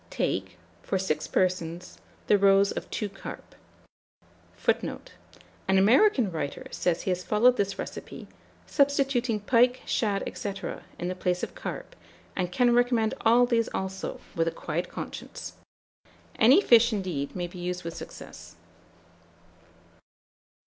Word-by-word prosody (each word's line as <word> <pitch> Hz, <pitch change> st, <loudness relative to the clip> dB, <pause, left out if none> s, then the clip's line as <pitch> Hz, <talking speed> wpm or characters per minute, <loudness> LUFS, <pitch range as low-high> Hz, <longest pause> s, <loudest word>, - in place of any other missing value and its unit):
Take, -, -, -2 dB, 0.2 s
for 195 Hz, -, -1 dB
6 155 Hz, -5 st, -1 dB
persons, 180 Hz, -1 st, -1 dB, 0.3 s
the 205 Hz, -, +4 dB
roes 195 Hz, 0 st, +5 dB
of -, -, -5 dB
2 210 Hz, -, -2 dB
carp; 195 Hz, 0 st, -10 dB, 1.0 s
[Footnote: -, -, -2 dB, 0.6 s
An 190 Hz, 0 st, +4 dB
American 235 Hz, -, +4 dB
writer 150 Hz, -4 st, -4 dB
says 175 Hz, -1 st, 0 dB
he 190 Hz, -, 0 dB
has 180 Hz, 0 st, -2 dB
followed 240 Hz, +6 st, +4 dB
this 200 Hz, -3 st, -1 dB
recipe, -, -, -7 dB, 0.4 s
substituting 270 Hz, -6 st, +1 dB
pike, 245 Hz, +3 st, +3 dB
shad, 205 Hz, -3 st, 0 dB
&c., 200 Hz, -, -3 dB, 0.4 s
in 175 Hz, -, -3 dB
the 185 Hz, -, -1 dB
place 180 Hz, -1 st, -1 dB
of -, -, -4 dB
carp, -, -, -7 dB, 0.4 s
and 180 Hz, -2 st, -1 dB
can 245 Hz, +5 st, +3 dB
recommend 240 Hz, -2 st, +2 dB
all 235 Hz, +2 st, +5 dB
these 235 Hz, -2 st, +1 dB
also, 190 Hz, 0 st, -4 dB, 0.2 s
with 165 Hz, 0 st, +1 dB
a -, -, +4 dB
quiet 165 Hz, +3 st, -4 dB
conscience. -, -, -7 dB, 0.8 s
Any 255 Hz, -, +6 dB
fish, 235 Hz, -, +6 dB
indeed, 185 Hz, -9 st, -3 dB
may 175 Hz, -1 st, -2 dB
be 175 Hz, +1 st, -9 dB
used 180 Hz, +1 st, -3 dB
with 165 Hz, 0 st, -6 dB
success. -, -, -10 dB
195 Hz, 135 wpm, -27 LUFS, 180-235 Hz, 1.0 s, Any